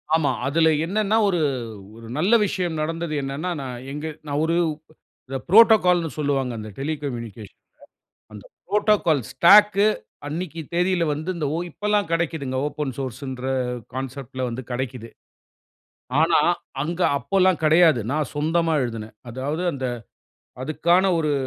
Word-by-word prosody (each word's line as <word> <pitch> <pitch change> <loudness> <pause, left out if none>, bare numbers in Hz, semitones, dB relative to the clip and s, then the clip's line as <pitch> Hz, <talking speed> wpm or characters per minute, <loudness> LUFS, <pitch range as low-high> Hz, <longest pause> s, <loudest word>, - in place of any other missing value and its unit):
ஆமா. 160 -3 +2 0.2
அதில 160 +3 +3 0.2
என்னனன்னா, 215 +3 +1
ஒரு 180 -3 +1 0.6
ஒரு 115 - -11
நல்ல 185 +9 +2
விஷயம் 180 -5 -2
நடந்தது 165 +1 -3
என்னன்னா, 140 +6 -3
நான் 130 -2 -5 0.2
எங்க 150 +2 -5 0.2
நான் 145 +1 -1
ஒரு 165 +1 +1 0.7
இந்த 135 - -3
புரோட்டோகால்ன்னு 180 -6 +5
சொல்லுவாங்க. 135 -4 0
அந்த 110 0 -7
டெலிகம்யூனிகேஷன்ல. 125 -8 -5 0.7
அந்த 105 -1 -11 0.2
புரோட்டோகால் 205 -6 +2
ஸ்டாக்கு 205 +3 +6 0.4
அன்னக்கி 165 +2 -4
தேதியில 180 0 +1
வந்து 155 +5 -3 0.2
ஓ - - 0
இப்பல்லாம் 210 +1 0
கிடைக்கிதுங்க, 160 -6 -1
ஓப்பன் 150 -3 -3
சோர்ஸ்சுன்ற 130 0 -5 0.5
கான்செப்ட்ல 130 0 -5
வந்து 120 +2 -5
கிடைக்கிது. 125 -2 -4 1.1
ஆனா, 165 +1 +4 0.4
அங்கு 170 +4 -1
அப்போல்லாம் 185 -2 +2
கிடையாது. 160 -4 +5
நான் 155 -1 -1
சொந்தமா 165 +2 +1
எழுதினேன். 115 -3 -5
அதாவது 140 +8 -3
அந்த 135 -1 -5 0.8
அதுக்கான 170 +6 +2
ஒரு 150 -2 0
155 Hz, 120 wpm, -23 LUFS, 135-175 Hz, 1.1 s, ஸ்டாக்கு